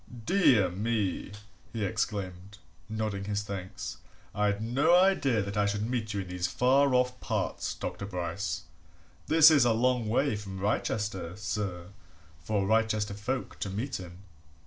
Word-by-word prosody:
"Dear 125 - +4
me!" 105 -1 -1 0.4
he 110 -3 -2
exclaimed, 95 0 -3 0.3
nodding 110 -3 -3
his 105 0 -1
thanks. 95 -2 -6 0.4
"I'd 105 0 +1
no 135 +10 +3
idea 180 - +3
that 100 +1 -5
I 105 -1 +2
should 105 +2 -1
meet 115 -3 -2
you 100 -1 -2
in 95 - -8
these 90 0 -1
far 130 +1 +3
off 125 0 +1
parts, - - -2
Dr. 100 - -5
Bryce! 90 -1 -3 0.6
This 160 0 +8
is 145 -4 +6
a 120 -2 +4
long 120 -1 +1
way 130 +2 +2
from 100 -2 -7
Wrychester, 100 -3 -1
sir, 95 -3 -4 0.5
for 100 +5 -1
Wrychester 110 -1 +1
folk 125 +6 -4
to 100 - -3
meet 115 +6 -3
in." 90 -1 -9
105 Hz, 145 wpm, -29 LUFS, 95-120 Hz, 0.6 s, This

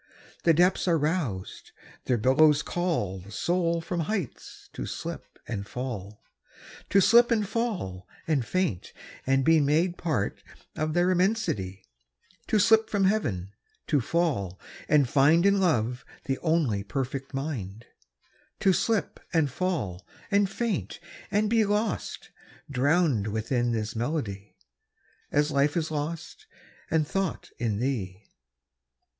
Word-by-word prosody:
The 165 - +6
depths 180 +3 +3
are 170 -2 +4
roused: 150 - -3 0.3
their 125 - +2
billows 145 +6 +4
callThe 100 - -2
soul 170 - 0
from 170 +1 -3
heights 170 - -4
to - - -5
slip - - -7
and 105 -3 -4
fall; 105 -5 -6 0.7
To 200 - +5
slip 235 +5 +6
and 215 -3 +1
fall 190 - -3 0.2
and 150 -6 +2
faint 175 - -2 0.3
and 135 0 +3
beMade 160 +3 +3
part 155 - -2 0.3
of 155 +1 -2
their 175 +1 +3
immensity; 180 - 0 0.6
To 220 - +2
slip 220 +1 +4
from 200 -2 +1
Heaven; 105 - 0 0.3
to 145 -4 +2
fall 120 - -1 0.3
and 150 -2 +5
findIn 165 +10 +4
love 125 - +1 0.2
the 135 -1 -1
only 155 - +1
perfect 135 +4 -4
mind; 115 -7 -4 0.8
To 190 - +4
slip 215 -2 0
and 160 -5 +2
fall 125 - -2 0.3
and 200 -1 +3
faint 220 -2 -3 0.3
and 210 +2 +2
beLost, 215 -1 0 0.4
drowned 140 - +2
within 120 +3 0
this 110 -1 -2
melody, 110 -6 -3 0.8
As 145 +1 +2
life 140 +3 +2
is 160 -1 -1
lost 165 - -5 0.4
and 155 -2 +1
thought 195 +1 -2
in 115 -4 0
thee. 105 -6 -3
150 Hz, 120 wpm, -27 LUFS, 115-180 Hz, 0.8 s, The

